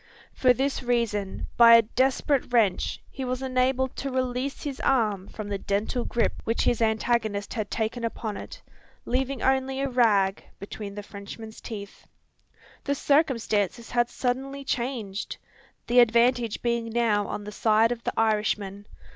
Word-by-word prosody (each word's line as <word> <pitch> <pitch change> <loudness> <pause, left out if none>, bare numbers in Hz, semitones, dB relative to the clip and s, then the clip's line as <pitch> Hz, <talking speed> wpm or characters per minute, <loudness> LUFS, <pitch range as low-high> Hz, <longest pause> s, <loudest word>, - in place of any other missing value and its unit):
For 255 - +4
this 270 +3 0
reason, 230 -5 -1
by 230 -1 +9
a 230 - +7
desperate 260 +3 +1
wrench, 215 -7 +2
he 265 - -6
was 255 +1 -3
enabled 260 0 +1
to 275 - -3
release 255 +1 -2
his 280 -3 -4
arm 210 -7 +1
from 215 -2 -7
the 200 -1 -3
dental 210 +6 -1
grip 235 - 0
which 230 - 0
his 235 - +1
antagonist 220 -2 0
had 215 -3 -3
taken 230 +2 -2
upon 225 -2 -3
it, - - -9 0.4
leaving 260 +1 -1
only 265 0 +1
a 275 - 0
rag 210 -6 +2
between 200 0 -7
the 205 - -6
Frenchman's 210 +2 -10
teeth. 205 -3 -9 0.8
The 280 - 0
circumstances 235 - +1
had 240 -1 +2
suddenly 270 +2 -3
changed! 235 -6 -3 0.5
the 245 +1 +4
advantage 235 -1 +3
being 235 -1 0
now 220 -3 +1
on 205 - -5
the 210 - -7
side 220 +2 +3
of 235 -1 -4
the - - -2
Irishman. 210 -2 0
235 Hz, 150 wpm, -26 LUFS, 210-255 Hz, 0.8 s, by